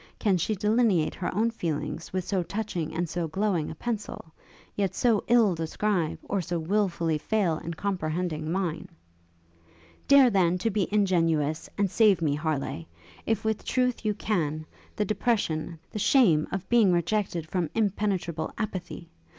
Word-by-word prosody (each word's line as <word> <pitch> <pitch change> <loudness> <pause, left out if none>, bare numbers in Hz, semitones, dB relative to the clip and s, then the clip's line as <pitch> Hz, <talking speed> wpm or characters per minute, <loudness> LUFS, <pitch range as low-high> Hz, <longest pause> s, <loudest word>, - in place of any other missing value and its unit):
Can 200 -3 +2
she 215 +6 0
delineate 210 -4 +2
her 180 - -3
own 225 +5 +1
feelings 165 -5 -4
with 185 0 -1
so 190 -2 0
touching 175 -2 -3
and 170 +2 -2
so 170 +1 -2
glowing 180 -1 -1
a - - -7
pencil, 210 -6 -5 0.4
yet 195 -3 -1
so 230 -4 +2
ill 230 -5 +5
describe, 165 +1 -1
or 200 - -1
so 175 +1 -3
wilfully 170 -3 0
fail 180 -3 0
in 170 0 -6
comprehending 160 -4 -2
mine?' 180 -1 -2 1.2
'Dare, 275 -3 +7
then, 180 -3 +3
to 225 +5 -1
be 200 -2 -1
ingenuous, 165 -7 +1
and 200 -3 +1
save 210 -6 +4
me, 155 -4 +1
Harleigh, 145 - -2 0.4
if 220 -1 0
with 220 -1 -1
truth 250 -2 0
you 210 -1 0
can, 155 -8 -1 0.3
the 210 - 0
depression, 195 -6 -1
the 210 - -4
shame, 190 - +4
of 190 0 -4
being 230 -6 +4
rejected 175 -1 0
from 170 -1 -1
impenetrable 195 -6 -1
apathy! 185 -5 -5
185 Hz, 150 wpm, -27 LUFS, 165-210 Hz, 1.2 s, Dare